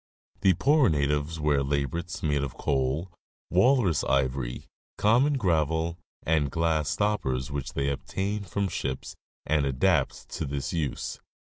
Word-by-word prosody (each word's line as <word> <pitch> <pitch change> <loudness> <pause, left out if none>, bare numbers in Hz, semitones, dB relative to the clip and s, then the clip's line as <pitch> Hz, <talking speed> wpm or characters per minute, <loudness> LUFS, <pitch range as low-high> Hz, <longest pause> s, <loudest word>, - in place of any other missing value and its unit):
The 95 -2 +4
poorer 145 - +4
natives 75 +1 0
wear 75 -2 +2
labrets 70 +7 -2
made 75 -2 +1
of 70 -3 -4
coal, 70 +6 -1 0.4
walrus 95 - +3
ivory, 65 -2 0 0.3
common 125 +8 +4
gravel, 85 - 0 0.2
and 75 -3 +2
glass 80 -1 +1
stoppers 75 -8 0
which 70 -2 -4
they 70 - -1
obtain 100 +8 -3
from 100 +1 -1
ships 65 -7 -4 0.3
and 75 -1 +2
adapt 65 -1 +1
to - - -4
this 70 +3 -3
use. 75 -6 -3
80 Hz, 130 wpm, -27 LUFS, 70-95 Hz, 0.4 s, The